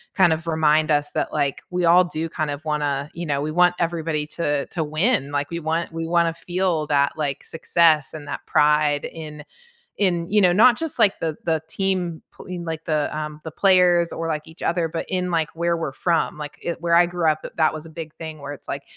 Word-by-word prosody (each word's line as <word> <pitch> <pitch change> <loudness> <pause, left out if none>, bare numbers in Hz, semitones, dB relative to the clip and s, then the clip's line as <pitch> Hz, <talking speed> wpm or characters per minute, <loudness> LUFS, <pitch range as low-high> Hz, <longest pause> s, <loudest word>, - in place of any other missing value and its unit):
kind 180 -4 +5
of 160 +1 -5
remind 155 -1 +3
us 145 0 +1
that, - - -2
like, 145 -3 -1
we 180 -1 0
all 175 +2 +6
do 165 -2 -3
kind 155 -1 -2
of 145 +2 -5
wanna 145 -2 -1
you 170 +1 -5
know, 140 -3 -1
we 155 +1 -2
want 180 +2 +4
everybody 165 -3 -1
to 145 -3 -1
to 165 - -3
win, 155 - 0
like, 145 0 -1
we 170 - -3
want 165 +1 -2
we 165 0 -3
wanna 170 -1 +2
feel 175 -2 -1
that, 140 -1 +2
like, 145 -3 -2
success 165 -3 +2
and 150 -2 -8
that 145 - -6
pride 150 -1 +3
in 150 -2 -8 0.6
in, 175 -4 +1
you 210 +1 +4
know, 180 -2 +5
not 240 +5 +6
just 320 -5 -4
like 205 -3 +4
the 160 -2 -1
the 160 -1 +1
team 185 -4 -1
pl - - -14
in 180 -1 -6
like 160 -1 -5
the, 155 -2 0
um 150 0 -5
the 160 - -5
players 180 -1 +4
or, 165 - -4
like, 155 -2 -3
each 160 - -15
other, 170 -1 0
but 165 +1 -4
in 180 -1 -1
like 165 -2 +1
where 170 +1 +1
we're 160 -4 -3
from. 165 +2 0
Like, 150 -1 -8
i 170 - -1
where 170 0 0
I 175 0 +6
grew 175 -2 -1
up 155 - -3
i - - -6
that 160 - +3
was 155 0 -7
a - - -12
big 160 -1 -8
thing 160 -1 -7
where 140 0 -6
it's 145 - -14
like, 140 - -4
160 Hz, 235 wpm, -22 LUFS, 150-175 Hz, 0.6 s, all